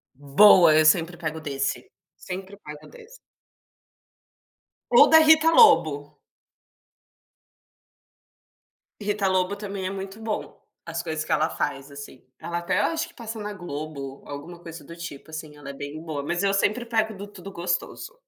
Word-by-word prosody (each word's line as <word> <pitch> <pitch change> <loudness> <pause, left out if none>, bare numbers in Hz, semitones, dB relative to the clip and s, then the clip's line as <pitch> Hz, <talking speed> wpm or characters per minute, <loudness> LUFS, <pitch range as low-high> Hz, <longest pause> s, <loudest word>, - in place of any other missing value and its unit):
Boa, 155 +4 +6
eu 155 - +4
sempre 165 +2 +3
pego 160 -2 -4
desse, 135 -2 -3 0.3
sempre 190 +2 -8
pego 150 -6 -11
desse. - - -15 1.7
Ou - - +7
da 320 - +8
Rita 315 0 +6
Lobo. 150 - +4 2.8
Rita 205 -1 -1
Lobo 185 +1 0
também 200 -2 -6
é - - -1
muito 195 +2 -7
bom, 220 -1 -5 0.2
as 165 0 -4
coisas 160 -2 -4
que - - -6
ela 155 +2 +2
faz 135 +1 -4
assim, 140 -2 -11 0.2
ela 170 0 -4
até 175 +3 -1
acho 325 +9 0
que 340 - -18
passa 225 -1 -7
na 210 0 -5
Globo, 150 -6 -7
alguma 150 +5 -9
coisa 165 -2 -10
do 170 +4 -11
tipo 165 -3 -9
assim, 155 -1 -8
ela 145 -1 -10
é - - -6
bem 145 +3 -8
boa, 155 -3 -5
mas 175 +5 -2
eu 195 0 +2
sempre 215 +4 0
pego 220 -2 0
do 200 +1 -8
Tudo 195 -1 -11
Gostoso. 175 - -3
175 Hz, 155 wpm, -24 LUFS, 155-205 Hz, 2.8 s, da